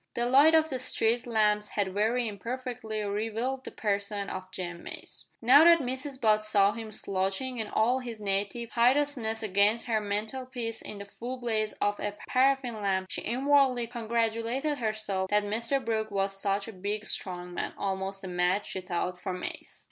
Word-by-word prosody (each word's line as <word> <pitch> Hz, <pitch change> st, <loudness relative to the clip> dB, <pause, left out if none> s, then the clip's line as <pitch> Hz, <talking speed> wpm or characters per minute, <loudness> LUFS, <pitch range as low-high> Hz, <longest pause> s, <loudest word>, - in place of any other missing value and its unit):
The 240 Hz, -, +1 dB
light 280 Hz, +6 st, +6 dB
of 320 Hz, -1 st, +3 dB
the 260 Hz, -, -2 dB
street 235 Hz, -1 st, +1 dB
lamps 210 Hz, -2 st, +2 dB
had 195 Hz, -3 st, -1 dB
very 225 Hz, +4 st, +1 dB
imperfectly 230 Hz, 0 st, -4 dB
revealed 225 Hz, +6 st, -2 dB
the -, -, -6 dB
person 200 Hz, -1 st, -2 dB
of 185 Hz, 0 st, -6 dB
Jem 175 Hz, -2 st, -5 dB
Mace. -, -, -7 dB, 0.2 s
Now 270 Hz, +6 st, +8 dB
that 340 Hz, 0 st, +8 dB
Mrs 260 Hz, 0 st, -4 dB
Butt 215 Hz, -3 st, +4 dB
saw 205 Hz, -2 st, +4 dB
him 225 Hz, -1 st, -7 dB
slouching 195 Hz, +6 st, -2 dB
in 220 Hz, -, -2 dB
all 240 Hz, +5 st, +2 dB
his 235 Hz, -4 st, -7 dB
native 205 Hz, +3 st, -2 dB
hideousness 245 Hz, -3 st, +2 dB
against 205 Hz, +3 st, +3 dB
her 220 Hz, -3 st, +1 dB
mantelpiece 230 Hz, +3 st, -3 dB
in 210 Hz, -, -7 dB
the 200 Hz, -, -7 dB
full 240 Hz, +5 st, -6 dB
blaze 220 Hz, -3 st, -1 dB
of 205 Hz, 0 st, -1 dB
a 205 Hz, 0 st, -3 dB
paraffin 255 Hz, -3 st, +2 dB
lamp, 190 Hz, -2 st, 0 dB
she -, -, -3 dB
inwardly 260 Hz, 0 st, +3 dB
congratulated 235 Hz, +4 st, -1 dB
herself 215 Hz, -4 st, -1 dB
that 210 Hz, 0 st, +3 dB
Mr 230 Hz, +6 st, 0 dB
Brooke 220 Hz, -1 st, -1 dB
was 195 Hz, -1 st, 0 dB
such 195 Hz, 0 st, -1 dB
a 225 Hz, -, -7 dB
big 205 Hz, +3 st, -3 dB
strong 180 Hz, -3 st, -3 dB
man -, -, -3 dB
almost 195 Hz, 0 st, -3 dB
a -, -, -5 dB
match, 180 Hz, +3 st, 0 dB
she 190 Hz, -, -3 dB
thought, 180 Hz, 0 st, -3 dB
for 185 Hz, -, -3 dB
Mace! 180 Hz, -, -7 dB
220 Hz, 175 wpm, -29 LUFS, 200-245 Hz, 0.2 s, Now